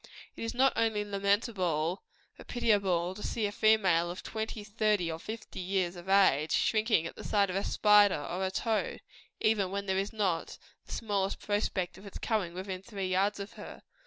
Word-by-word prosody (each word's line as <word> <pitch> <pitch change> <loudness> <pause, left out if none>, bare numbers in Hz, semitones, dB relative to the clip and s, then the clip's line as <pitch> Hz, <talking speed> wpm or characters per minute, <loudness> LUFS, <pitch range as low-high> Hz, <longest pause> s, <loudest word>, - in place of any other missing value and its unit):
It - - -6
is 230 - -3
not 265 +2 +4
only 220 -2 +1
lamentable, 195 -4 0 0.3
but - - -14
pitiable, 195 -7 +1
to 210 - -10
see 225 0 -1
a 205 - -1
female 195 -6 +3
of 180 +2 -7
twenty, 220 -1 -4
thirty, 210 -4 0
or 160 - -5
fifty 220 +3 -7
years 185 -1 -1
of 175 +2 -10
age, 175 -6 +4
shrinking 215 -6 +2
at - - -6
the - - -9
sight 200 -3 +2
of - - -4
a 195 - 0
spider, 205 -5 +5
or 180 +5 -3
a 190 - +1
toad, 220 +3 -1 0.4
even 210 -4 +2
when 200 +1 -3
there 190 -1 0
is 195 +1 -2
not 195 -7 -1 0.3
the - - -12
smallest 200 -3 -1
prospect 190 -3 -2
of 200 - -12
its 200 - -8
coming 200 -7 -1
within 185 0 -5
three 195 -2 -4
yards 195 +3 +1
of 200 +1 -7
her. - - -10
200 Hz, 190 wpm, -30 LUFS, 185-215 Hz, 0.4 s, spider